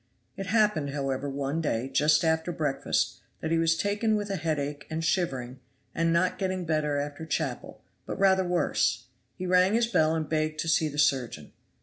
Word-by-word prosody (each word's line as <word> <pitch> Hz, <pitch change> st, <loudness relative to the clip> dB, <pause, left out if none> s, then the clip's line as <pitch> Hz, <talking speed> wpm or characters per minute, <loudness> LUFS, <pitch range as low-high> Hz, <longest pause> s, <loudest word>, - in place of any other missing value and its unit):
It 195 Hz, -, -5 dB
happened, 210 Hz, -10 st, +2 dB
however, 135 Hz, 0 st, -2 dB
one 140 Hz, +3 st, -2 dB
day, 125 Hz, -5 st, -1 dB
just 150 Hz, +3 st, +3 dB
after 160 Hz, +2 st, +1 dB
breakfast, 150 Hz, -5 st, -1 dB, 0.2 s
that 160 Hz, -, -3 dB
he 165 Hz, -, +3 dB
was 165 Hz, 0 st, +2 dB
taken 210 Hz, +2 st, +1 dB
with 205 Hz, -1 st, -2 dB
a -, -, -1 dB
headache 150 Hz, -3 st, -3 dB
and 160 Hz, +1 st, -3 dB
shivering; 135 Hz, -8 st, -1 dB, 0.3 s
and 165 Hz, 0 st, +1 dB
not 170 Hz, +2 st, +1 dB
getting 185 Hz, -2 st, -2 dB
better 155 Hz, -2 st, 0 dB
after 145 Hz, +2 st, -4 dB
chapel, 160 Hz, -, -4 dB, 0.2 s
but -, -, -4 dB
rather 190 Hz, -1 st, +4 dB
worse, 135 Hz, -9 st, 0 dB, 0.3 s
he 185 Hz, -, -5 dB
rang 185 Hz, +3 st, +4 dB
his 235 Hz, 0 st, +3 dB
bell 160 Hz, -8 st, +2 dB
and 160 Hz, -2 st, -2 dB
begged 155 Hz, 0 st, -1 dB
to 165 Hz, -, -4 dB
see 160 Hz, -1 st, +3 dB
the 145 Hz, -, -8 dB
surgeon. 130 Hz, -, 0 dB
160 Hz, 185 wpm, -27 LUFS, 145-180 Hz, 0.3 s, rather